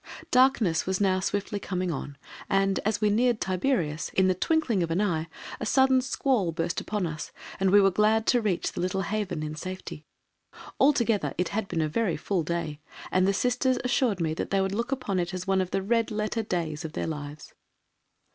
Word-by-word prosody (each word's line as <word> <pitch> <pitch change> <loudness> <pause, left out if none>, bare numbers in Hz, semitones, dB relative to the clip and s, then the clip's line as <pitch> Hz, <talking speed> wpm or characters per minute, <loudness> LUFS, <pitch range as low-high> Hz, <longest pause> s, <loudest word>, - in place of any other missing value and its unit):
Darkness 250 -11 +3
was 190 -1 0
now 190 -2 +2
swiftly 200 +2 -2
coming 185 -2 -2
on 145 -1 -6 0.3
and, 195 0 +2
as 215 +1 -1
we 210 -1 +3
neared 240 +1 +2
Tiberias, 180 - -1
in 190 0 +4
the 185 - +3
twinkling 245 - +1
of 170 - -1
an 165 +3 0
eye, 170 -6 0 0.3
a - - -3
sudden 265 +1 +4
squall 250 -8 0
burst 165 +1 -2
upon 210 -3 -2
us, 155 -2 -5 0.3
and 195 0 +3
we 205 +2 +7
were 195 -1 +5
glad 215 +3 +2
to 245 - +3
reach 200 -5 -1
the - - -4
little 185 +2 -1
haven 200 -4 -2
in 155 0 -4
safety. 185 -1 -7 0.8
Altogether 235 -7 +2
it 180 - 0
had 205 0 -2
been 165 - -1
a 155 - +1
very 180 +4 0
full 180 +3 -1
day 160 -2 -3 0.3
and 185 0 +3
the - - +4
Sisters 250 +5 +1
assured 250 -5 +1
me 160 -2 0
that - - -4
they 195 - +1
would 190 0 0
look 235 +5 -2
upon 250 -8 -1
it 175 +1 -2
as 185 0 -5
one 190 -1 +2
of 185 - -3
the 195 - -1
red 230 +2 +1
letter 215 +1 -1
days 170 -6 -3
of 160 -1 -6
their - - -2
lives. 150 -1 -7
195 Hz, 205 wpm, -27 LUFS, 170-220 Hz, 0.8 s, we